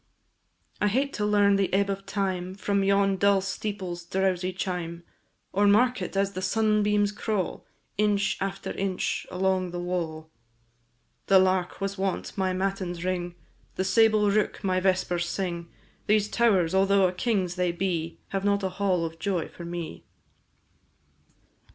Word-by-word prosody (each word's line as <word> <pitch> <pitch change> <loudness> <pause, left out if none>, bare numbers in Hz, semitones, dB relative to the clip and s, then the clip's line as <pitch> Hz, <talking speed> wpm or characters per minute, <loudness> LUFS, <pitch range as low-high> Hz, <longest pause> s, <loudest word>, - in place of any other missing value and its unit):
I 210 - +4
hate 270 +7 0
to 210 - -1
learn 205 -1 +4
the 195 -1 0
ebb 195 +1 +2
of 195 0 -4
time 190 -2 -2
From 200 0 0
yon 195 0 +3
dull 200 +1 +4
steeple's 190 -2 -4
drowsy 185 0 0
chime, 175 -2 -4 0.5
Or 205 +1 +3
mark 245 +5 +4
it - - -4
as 195 0 +1
the 185 -1 -5
sunbeams 210 -1 +2
crawl, 210 -3 -3 0.3
Inch 205 -1 +2
after 195 0 -3
inch, 190 -1 -2
along 185 0 0
the 175 0 -5
wall. 165 -3 -3 1.0
The 195 - +6
lark 185 -1 +2
was 195 0 -3
wont 190 -1 -2
my 190 -1 0
matins 185 -2 -2
ring, 175 -1 -2 0.4
The 190 - 0
sable 215 +1 +4
rook 210 +1 0
my 185 -1 +1
vespers 185 -2 +1
sing: 170 -3 -3 0.4
These 210 0 +3
towers, 195 -9 +2
although 195 0 +4
a - - -1
king's 185 -2 0
they 180 -1 0
be, 170 -2 -2
Have 195 -1 -2
not 200 0 +1
a 190 - 0
hall 185 -2 0
of 165 0 -7
joy 185 -3 -1
for 170 - -10
me. 170 -1 -6
190 Hz, 150 wpm, -27 LUFS, 180-200 Hz, 1.0 s, The